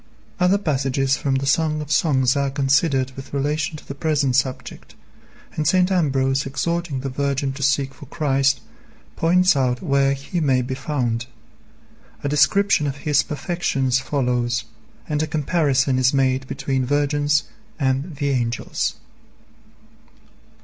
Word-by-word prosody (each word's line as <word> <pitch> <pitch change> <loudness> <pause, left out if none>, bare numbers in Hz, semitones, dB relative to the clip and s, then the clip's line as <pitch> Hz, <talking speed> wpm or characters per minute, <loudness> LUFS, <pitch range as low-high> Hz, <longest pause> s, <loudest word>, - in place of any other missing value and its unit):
Other 180 +2 +4
passages 135 -6 0
from 135 -1 -1
the 135 +1 -1
Song 155 +2 +1
of 150 -1 -6
Songs 130 -5 +2
are 140 -1 +1
considered 135 0 +1
with 135 +1 -8
relation 150 +3 -1
to - - -14
the - - -5
present 140 -3 0
subject, 130 -1 -3 0.6
and 155 -1 -1
St. 185 +2 +3
Ambrose 135 -6 +1
exhorting 155 +1 -2
the 140 - -4
virgin 140 0 -1
to 140 - -9
seek 135 0 +1
for 135 +1 -13
Christ, 135 -3 +1 0.5
points 180 +1 +3
out 125 -2 +1
where 140 -3 +2
He 140 +6 -4
may 135 -5 +2
be 130 +2 -4
found. 125 -4 -2 1.0
A 145 - -1
description 155 +3 +3
of 140 0 -4
His 150 -1 +4
perfections 140 -5 -1
follows, 125 -3 -1 0.4
and 150 -1 -1
a 155 - -1
comparison 145 -4 +1
is 130 +2 +3
made 130 -1 +1
between 135 -1 -2
virgins 145 +2 +1 0.4
and 135 +4 -1
the 140 0 -1
angels. 120 -3 -1
140 Hz, 140 wpm, -22 LUFS, 130-150 Hz, 1.0 s, Other